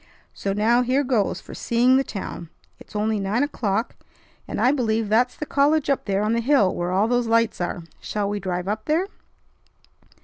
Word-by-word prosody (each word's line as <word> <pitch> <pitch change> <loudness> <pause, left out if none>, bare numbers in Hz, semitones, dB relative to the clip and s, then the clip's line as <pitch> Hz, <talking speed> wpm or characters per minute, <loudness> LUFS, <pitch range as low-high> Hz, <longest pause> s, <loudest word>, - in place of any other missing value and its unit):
So 195 - -3
now 220 +5 +3
here 255 +3 +1
goes 240 -7 0
for - - -11
seeing 245 +2 +2
the 270 - +3
town. 190 -7 -7 0.3
It's - - -16
only 215 0 0
nine 200 +7 0
o'clock, 225 -6 -2 0.5
and - - -4
I 250 - +4
believe 225 -6 0
that's 245 +4 +2
the 300 - -5
college 290 +1 +2
up 275 - -1
there 200 0 0
on 215 +2 +1
the 235 - +1
hill 230 -7 +3
where 175 0 -2
all 195 +4 +2
those 245 0 +1
lights 230 -3 +2
are. 175 0 -3 0.2
Shall 205 -1 -2
we 205 0 -2
drive 180 -1 -3
up 215 +2 -3
there?" 320 +5 +1
225 Hz, 195 wpm, -23 LUFS, 200-255 Hz, 0.5 s, I